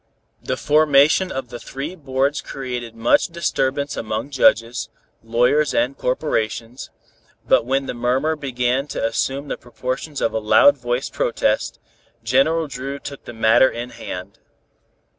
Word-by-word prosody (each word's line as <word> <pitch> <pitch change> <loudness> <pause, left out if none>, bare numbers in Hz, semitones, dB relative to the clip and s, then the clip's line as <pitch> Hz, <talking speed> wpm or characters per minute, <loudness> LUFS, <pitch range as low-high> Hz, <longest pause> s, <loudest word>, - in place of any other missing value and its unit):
The 130 - -3
formation 150 +5 +4
of 130 -2 -5
the 120 - -7
three 140 +8 -6
boards 140 -2 -1
created 125 -4 -6
much 115 +1 +3
disturbance 140 -5 -1
among 110 +5 -4
judges, 120 -3 +2 0.3
lawyers 125 +6 +2
and 130 +3 +1
corporations, 125 -3 -2 0.6
but 115 - +3
when 135 +1 +1
the - - -4
murmur 130 +6 0
began 130 -1 -1
to - - -3
assume 135 +5 -1
the - - -4
proportions 130 +5 -5
of 115 - 0
a 110 - 0
loud 110 +6 +5
voiced 120 0 -3
protest, - - 0 0.5
General 135 +8 +2
Dru 135 0 -5
took 140 0 -9
the - - -8
matter 110 +3 +5
in 120 +1 -6
hand. 100 -5 -8
130 Hz, 140 wpm, -21 LUFS, 120-140 Hz, 0.6 s, loud